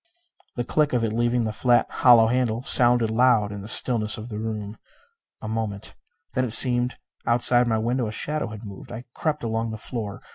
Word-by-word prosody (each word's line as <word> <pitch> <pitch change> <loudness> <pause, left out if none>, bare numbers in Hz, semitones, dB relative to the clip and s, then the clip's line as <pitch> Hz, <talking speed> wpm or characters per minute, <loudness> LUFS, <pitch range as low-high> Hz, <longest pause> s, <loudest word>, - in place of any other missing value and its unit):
The 120 - -3
click 150 +3 -1
of 120 -2 0
it 110 -1 -2
leaving 120 +1 0
the 110 -1 -3
flat, 120 +1 +2
hollow 120 -3 +4
handle 120 0 -1
sounded 120 -4 +5
loud 115 -3 +2
in 100 -1 -7
the 100 - -10
stillness 110 -1 +2
of 110 +2 -9
the 105 -2 -6
room. 110 -1 -6 0.7
A - - -5
moment. 110 -2 -5 0.4
Then 130 - 0
it 120 -4 -4
seemed 125 0 +3 0.3
that - - -5
outside 120 0 +3
my 110 -1 0
window 120 +2 -2
a - - -5
shadow 150 +6 -4
had 110 0 -10
moved. 120 +6 -11
I 120 0 -8
crept 150 -3 -3
along 115 0 -3
the 110 - -6
floor. 105 -2 -7
115 Hz, 205 wpm, -23 LUFS, 110-125 Hz, 0.7 s, sounded